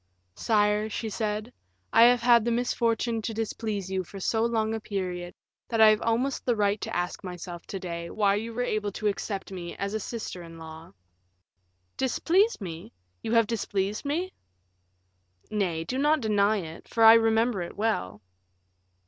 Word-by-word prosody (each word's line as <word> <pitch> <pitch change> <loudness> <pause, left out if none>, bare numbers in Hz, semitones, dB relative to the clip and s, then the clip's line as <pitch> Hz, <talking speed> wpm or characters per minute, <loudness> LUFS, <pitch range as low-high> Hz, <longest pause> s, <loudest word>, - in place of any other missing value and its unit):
"Sire," 210 - +1
she 220 +1 -4
said, 215 +2 -3 0.4
"I 230 +1 +8
have 245 0 +5
had 235 -1 +5
the 235 - 0
misfortune 235 -1 0
to 220 +1 -4
displease 215 -3 -3
you 190 -1 -1
for 195 +3 -10
so 220 +4 0
long 225 -2 0
a 225 - -2
period, 180 -4 -4 0.3
that 230 - -2
I 220 -1 +9
have 215 0 +3
almost 245 +4 0
the 245 - +1
right 205 -1 +1
to - - -4
ask 175 0 -2
myself 175 -1 -7
to 195 - -5
day 170 -2 -5
why 200 0 +2
you 220 +3 -2
were 245 +2 -2
able 215 -3 -1
to 215 - -6
accept 200 -1 -2
me 175 -2 -6
as 200 +1 -3
a 220 - -1
sister 215 -4 -6
in 165 -1 -11
law." 160 0 -10 1.1
"Displease 360 - +2
me! 170 -5 -7 0.3
You 225 - -3
have 230 -1 +5
displeased 205 -2 -2
me?" 335 +6 -2 1.2
"Nay, 180 -6 -1
do 255 +11 -3
not 300 +2 +3
deny 210 -1 +2
it, 165 -3 -8
for 225 - +1
I 225 0 +11
remember 225 -2 +3
it 170 - -7
well." 105 - -1
215 Hz, 175 wpm, -27 LUFS, 190-230 Hz, 1.2 s, I